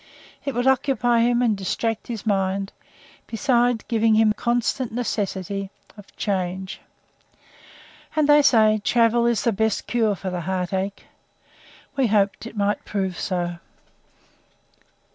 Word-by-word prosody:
It 275 -3 -3
would 245 +1 0
occupy 250 -3 +2
him 240 +1 +3
and 225 -3 +2
distract 220 +3 -2
his 230 -3 -6
mind, 195 -1 0 0.5
besides 240 -1 +1
giving 225 -1 +3
him 215 -1 +4
constant 240 +2 -1
necessity 200 -4 -3 0.3
of 205 -2 -15
change. 190 -2 -3 1.3
And, 305 -2 +2
they 295 0 +7
say, 215 -6 +4
travel 235 0 +3
is 235 -2 +1
the 235 - +2
best 220 +1 0
cure 225 -4 +1
for 190 0 -5
the 180 -1 -3
heart 180 +1 -3
ache. 195 +1 -3 0.9
We 270 -3 +2
hoped 200 0 +1
it 230 - -11
might 205 0 0
prove 190 -3 -3
so. 175 -2 -2
220 Hz, 130 wpm, -23 LUFS, 195-240 Hz, 1.3 s, they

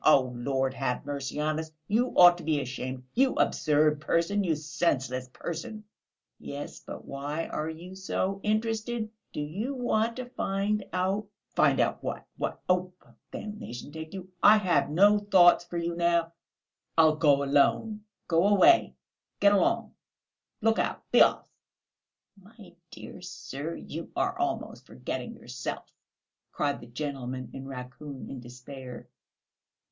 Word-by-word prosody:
Oh, 130 -4 +5
Lord 130 +2 0
have 135 -2 -2
mercy 140 0 -4
on 155 +1 0
us! 160 0 -5 0.2
You 230 +5 +2
ought 175 -1 +9
to - - -9
be 155 -2 +1
ashamed, 130 -1 -5
you 265 +1 +3
absurd 150 0 +2
person, 170 +6 +1
you 165 -4 +1
senseless 140 -4 -1
person!" 210 - -6 0.6
"Yes, 140 +1 -7
but - - -9
why 145 +4 -4
are 155 +1 -3
you 170 +3 -8
so 190 0 -2
interested? 220 +1 -1 0.2
Do - - -4
you 200 - -3
want 230 -2 +1
to 255 - -5
find 205 -3 -1
out...." 190 +3 0 0.2
"Find - - +3
out - - +1
what? - - -4
What? - - -3
Oh, 180 0 +2
well, - - -24 0.2
damnation 175 - -7
take 160 +3 -8
you! 185 -1 -8
I 210 +1 +8
have 185 -8 +2
no 200 +7 +5
thoughts 180 -4 +5
for 175 0 -5
you 170 0 -2
now; 170 -1 +1 0.6
I'll 160 -1 +6
go 145 -3 +4
alone. 175 +10 +2 0.2
Go 170 +3 +3
away; 320 - +5 0.4
get 200 0 +6
along; 200 - +2 0.7
look 225 0 +3
out; - - -1
be - - +6
off!" - - +4 0.9
"My 200 -1 -16 0.2
dear - - -10
sir, 165 -3 -6
you 165 +2 -7
are - - 0
almost - - -3
forgetting 65 - -5
yourself!" - - -6 0.6
cried 145 -1 -1
the 120 - -11
gentleman 130 -1 -5
in 135 0 -7
raccoon 135 +2 -8
in 135 - -6
despair. 125 +1 -10
165 Hz, 145 wpm, -28 LUFS, 140-200 Hz, 0.9 s, ought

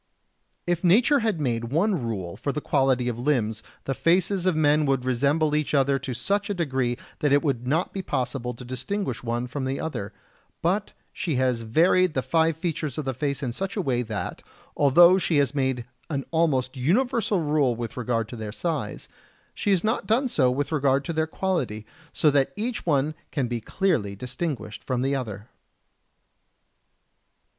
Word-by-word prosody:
60. - - +2
If 175 0 -1
nature 245 - +5
had 220 -7 0
made 120 -5 -1
one 165 - +1
rule 95 -6 -4
for 140 - -2
the 150 - -3
quality 135 -4 +1
of 120 -1 -2
limbs, 120 -5 0 0.2
the 135 - -1
faces 180 +4 +2
of 185 - +3
men 150 -1 +3
would 135 -2 +1
resemble 145 +5 +2
each 150 0 0
other 135 0 +3
to 130 -2 -5
such 200 - -1
a 205 - -1
degree 130 -8 0 0.2
that 145 -3 +1
it 145 0 +4
would 125 -5 -1
not 160 +7 0
be 195 - -3
possible 125 -5 -2
to 125 - -10
distinguish 130 - -3
one 120 +1 -2
from 130 +2 -4
the 135 +1 -2
other; 105 -11 -4 0.5
but 190 +5 0 0.2
she 165 -7 -2
has 125 -2 +1
varied 165 +9 +3
the 130 - 0
five 160 +3 +2
features 160 -5 -3
of 155 - -3
the 135 - -1
face 140 +1 -2
in 120 -3 -2
such 195 +8 -4
a - - +2
way 125 -5 +1
that, 110 -4 -4 0.3
although 170 +6 +6
she 165 -3 +1
has 140 -2 +2
made 130 -4 -1 0.2
an 140 -4 -2
almost 140 -6 +1
universal 205 - +1
rule 145 -5 +2
with 115 0 -5
regard 115 -2 -1
to 120 - -7
their 110 -2 -5
size, 145 -3 -3 0.5
she - - -2
has 190 -4 +3
not 220 +2 0
done 245 +5 +2
so 135 - +2
with 140 +4 -1
regard 140 -2 +2
to 170 - -3
their 160 0 0
quality, 150 - -2 0.3
so 150 - +3
that 140 -1 +2
each 220 -1 -3
one 145 0 +2 0.2
can 140 -6 -1
be 120 -1 -3
clearly 125 - 0
distinguished 125 - -5
from 125 -1 -1
the 135 +1 +1
other. 110 -5 -5
140 Hz, 185 wpm, -25 LUFS, 125-170 Hz, 0.5 s, although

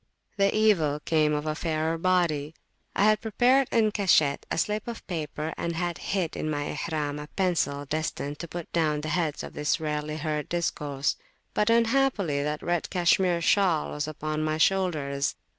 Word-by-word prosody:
The 200 -2 +3
evil 165 -10 +3
came 155 -1 +2
of 150 0 -1
a 155 - 0
fairer 160 0 -1
body. 165 -4 +1 0.4
I - - +3
had 215 0 +4
prepared 250 +4 +3
en 220 -2 +3
cachette 170 -9 +2
a - - -2
slip 210 +5 -1
of 235 -1 -6
paper, 155 -2 -4
and 170 0 -2
had 175 0 -2
hid 185 -4 -2
in 155 - -2
my 145 -1 -2 0.2
Ihram 150 -2 -2
a 150 - -7
pencil 160 -6 0
destined 150 -1 -3
to 170 - -5
put 170 0 -7
down 155 -3 +1
the 155 - -4
heads 160 -2 -1
of - - -8
this 150 +2 0
rarely 150 0 -3
heard 150 -1 -3
discourse. 150 -5 -1 0.4
But 210 +1 +2
unhappily 230 - +2
that 150 +1 -3
red 175 -1 -1
cashmere 175 -1 +2
shawl 175 -3 +2
was 150 0 -3
upon 155 0 -3
my 155 0 0
shoulders. 155 -6 +1
160 Hz, 175 wpm, -27 LUFS, 150-185 Hz, 0.4 s, had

